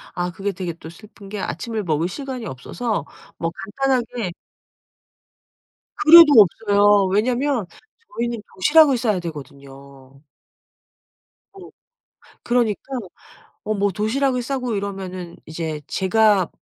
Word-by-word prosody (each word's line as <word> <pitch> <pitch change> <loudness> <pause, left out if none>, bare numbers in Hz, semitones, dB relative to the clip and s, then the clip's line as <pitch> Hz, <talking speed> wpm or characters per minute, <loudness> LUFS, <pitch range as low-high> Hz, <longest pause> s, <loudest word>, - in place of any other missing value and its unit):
아 175 0 -2
그게 195 +3 -3
되게 180 -2 -5
또 160 0 -12
슬픈 200 +3 -15
게 210 0 -6
아침을 215 +5 -4
먹을 160 -1 0
시간이 260 +3 -6
없어서 210 - -4 0.3
뭐 165 - -2 0.2
간단하게 245 -6 -1 1.6
그래도 335 +2 +9
없어요. 205 0 +4
왜냐면 240 +4 0 0.5
저희는 235 -1 -2
도시락을 290 +6 +5
싸야 215 -5 0
되거든요. 140 -4 -11 1.3
어. 390 -2 -12 0.7
그러니까 240 -4 0 0.8
어 215 - -1
뭐 200 0 +1
도시락을 250 +6 0
싸고 250 -2 -3
이러면은 190 -3 -6
이제 160 -1 -5
제가 200 0 +2
205 Hz, 245 characters per minute, -21 LUFS, 175-240 Hz, 1.6 s, 그래도